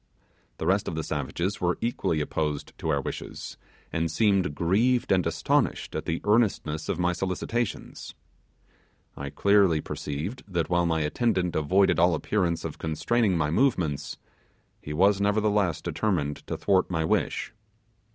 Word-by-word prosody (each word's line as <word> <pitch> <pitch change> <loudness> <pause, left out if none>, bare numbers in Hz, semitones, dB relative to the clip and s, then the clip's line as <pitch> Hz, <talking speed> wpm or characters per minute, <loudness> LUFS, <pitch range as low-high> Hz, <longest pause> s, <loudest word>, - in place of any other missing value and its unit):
The - - -4
rest 95 +2 +2
of - - -3
the 80 - -2
savages 80 +7 -3
were 90 0 +1
equally 100 -9 -1
opposed 75 -1 -2
to - - -3
our 70 -2 +2
wishes, - - -6 0.4
and 80 0 0
seemed 95 -2 +2
grieved 115 +10 +2
and 95 -2 +3
astonished - - 0
at - - -3
the 80 - -2
earnestness 100 -8 +1
of - - 0
my 90 0 +1
solicitations. 95 +5 -3 1.0
I 70 0 -5
clearly 100 -1 +3
perceived 75 - -5
that 85 -1 -1
while 85 -1 +3
my 80 -1 +1
attendant 90 +2 0
avoided 95 +6 +3
all 85 0 +4
appearance 85 0 -1
of - - -6
constraining 95 +5 +1
my 75 -2 0
movements, 80 - 0 0.6
he 75 - -7
was 95 +6 +3
nevertheless 105 -4 +1
determined 80 -9 -1
to - - -3
thwart 95 -2 +2
my 80 -3 0
wishes. - - 0
90 Hz, 145 wpm, -27 LUFS, 80-100 Hz, 1.0 s, all